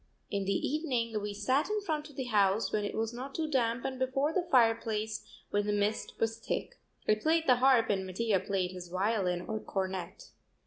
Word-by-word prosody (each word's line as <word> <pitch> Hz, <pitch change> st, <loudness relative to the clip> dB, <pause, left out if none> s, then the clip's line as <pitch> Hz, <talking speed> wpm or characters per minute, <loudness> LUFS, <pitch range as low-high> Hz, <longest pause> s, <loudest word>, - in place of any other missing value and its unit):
In 200 Hz, -1 st, -1 dB
the 195 Hz, 0 st, 0 dB
evening 245 Hz, -8 st, -1 dB
we 205 Hz, 0 st, -3 dB
sat 255 Hz, -, +1 dB
in 425 Hz, 0 st, +1 dB
front 310 Hz, -6 st, -3 dB
of 290 Hz, -, -16 dB
the 265 Hz, -, -2 dB
house 210 Hz, -3 st, +2 dB
when 210 Hz, -, 0 dB
it 205 Hz, -, -3 dB
was 225 Hz, +1 st, -1 dB
not 260 Hz, +3 st, -7 dB
too 320 Hz, -1 st, -1 dB
damp 245 Hz, -4 st, 0 dB
and 260 Hz, -1 st, -3 dB
before 270 Hz, +4 st, +1 dB
the 355 Hz, 0 st, 0 dB
fireplace 225 Hz, -3 st, +2 dB, 0.3 s
when 205 Hz, 0 st, +1 dB
the -, -, +2 dB
mist 205 Hz, +1 st, -1 dB
was 225 Hz, 0 st, 0 dB
thick. -, -, -4 dB, 0.3 s
I -, -, +6 dB
played 315 Hz, +9 st, +2 dB
the 250 Hz, -4 st, +5 dB
harp 255 Hz, -3 st, +4 dB
and 190 Hz, -2 st, -1 dB
Mattia 200 Hz, +1 st, +1 dB
played 185 Hz, -1 st, -1 dB
his 180 Hz, -1 st, -8 dB
violin 185 Hz, -1 st, 0 dB
or 215 Hz, +4 st, -3 dB
cornet. 190 Hz, -3 st, -4 dB
225 Hz, 200 wpm, -31 LUFS, 200-260 Hz, 0.3 s, I